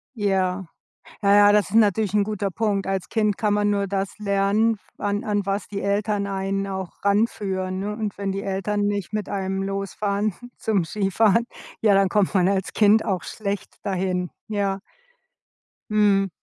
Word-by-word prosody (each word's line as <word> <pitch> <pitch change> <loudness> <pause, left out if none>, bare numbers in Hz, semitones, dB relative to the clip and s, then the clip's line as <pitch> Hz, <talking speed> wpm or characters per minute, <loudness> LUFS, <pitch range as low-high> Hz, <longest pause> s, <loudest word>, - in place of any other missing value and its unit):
Ja. 190 -3 0 0.6
Na 200 0 +4
ja, 205 0 +7
das 210 -1 +2
ist - - -2
natürlich 210 -2 +3
'n 210 -1 +4
guter 200 -1 -2
Punkt. 205 -1 0
Als 195 -1 -2
Kind 210 -2 +1
kann 210 -2 +1
man 205 0 +2
nur 200 -1 0
das 195 +1 -3
lernen, 205 +2 +2 0.2
an 205 0 -1
an 205 -1 0
was 195 +1 -2
die 200 -1 -5
Eltern 200 0 0
einen 195 0 -2
auch 190 -1 -6
ranführen, 195 -3 0
ne? 205 +2 -3
Und 215 -2 -4
wenn 195 -1 -1
die 195 +1 -3
Eltern 200 +2 -1
nicht 205 -3 -1
mit 215 -2 -3
einem 195 0 -2
losfahren 200 +1 -2 0.2
zum 200 -6 0
Skifahren, 215 +4 +2 0.3
ja, 210 -3 +5
dann 195 -1 +4
kommt 205 0 +1
man 185 -1 +4
als 195 -1 -1
Kind 215 +1 +5
auch 190 -3 -1
schlecht 200 -2 -5
dahin, 185 -2 -1 0.2
ja. 200 -2 -1 1.1
Mhm. 200 -2 +3
200 Hz, 170 wpm, -23 LUFS, 195-210 Hz, 1.1 s, ja